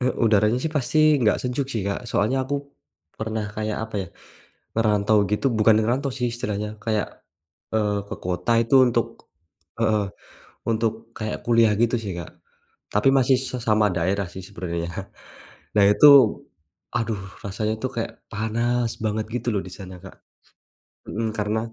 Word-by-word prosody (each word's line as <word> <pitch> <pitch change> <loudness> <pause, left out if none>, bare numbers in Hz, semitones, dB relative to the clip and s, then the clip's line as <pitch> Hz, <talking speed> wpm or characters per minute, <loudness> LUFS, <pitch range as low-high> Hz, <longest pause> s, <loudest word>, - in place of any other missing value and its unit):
he 125 - 0 0.2
udaranya 110 +2 +3
sih 160 - -1
pasti 155 +1 +3
nggak 110 -3 +3
sejuk 130 +2 -1
sih, 115 -7 -3
Kak, 100 +5 -3
soalnya 130 +6 0
aku 145 - -2 0.6
pernah 110 -1 -2
kayak 110 0 -2
apa - - -14
ya, - - -14 0.7
ngerantau 105 -1 +3
gitu 105 +6 0
bukan 105 0 +6
ngerantau 130 +5 0
sih 125 -2 -1
istilahnya, 105 -2 -4
kayak, 110 -2 0 0.7
eee, 105 -2 +1
ke - - -4
kota 90 +6 0
itu 115 +4 0
untuk 120 - +1 0.7
heeh, 110 -2 +2 0.6
untuk 115 0 +1 0.2
kayak 110 -1 -4
kuliah 115 -2 +4
gitu 120 +1 +3
sih, 95 -3 -4
Kak. 85 - -7 0.6
Tapi 105 +6 +4
masih 130 0 +4
sesama 115 -5 +1
daerah 95 +2 0
sih 95 - -7
sebenarnya. 85 -3 -4 0.9
Nah 100 - +6
itu, 105 +8 +6 0.9
aduh 115 -4 -1 0.2
rasanya 105 +2 -2
tuh 130 - -1
kayak 115 - -2 0.2
panas 115 +2 0
banget 110 0 -1
gitu 125 0 -3
loh, 100 - +1
di - - -8
sana, 95 -1 -9
Kak. 95 - -12 1.0
Mhm, 110 +1 -2
karena 105 +1 0
110 Hz, 150 wpm, -24 LUFS, 105-120 Hz, 1.0 s, bukan